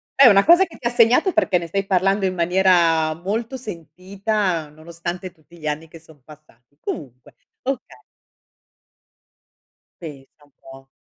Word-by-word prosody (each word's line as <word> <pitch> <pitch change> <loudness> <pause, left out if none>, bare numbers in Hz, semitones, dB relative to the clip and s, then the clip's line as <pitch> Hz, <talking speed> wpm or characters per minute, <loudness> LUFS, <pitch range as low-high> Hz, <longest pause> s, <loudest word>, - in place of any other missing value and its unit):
È 275 -2 +8
una 200 -2 +5
cosa 350 +4 +6
che 330 - -15
ti 235 - -3
ha - - -1
segnato, 245 - +3
perché 210 - +2
ne 170 -1 -5
stai 195 +3 -2
parlando 195 +1 +1
in 185 -1 -1
maniera 170 -3 +2
molto 220 +9 -4
sentita, 185 - -4
nonostante 170 +4 -7
tutti 170 +1 -21
gli 155 -1 -7
anni 155 +2 -4
che 165 +1 -14
son 155 -4 -21
passati. 145 -3 -20
Comunque, 125 -6 -8 0.3
okay. 270 +1 -5 2.0
Pensa 145 -2 -12
un 145 - -28
po'. 135 0 -15
175 Hz, 145 wpm, -21 LUFS, 155-200 Hz, 2.0 s, È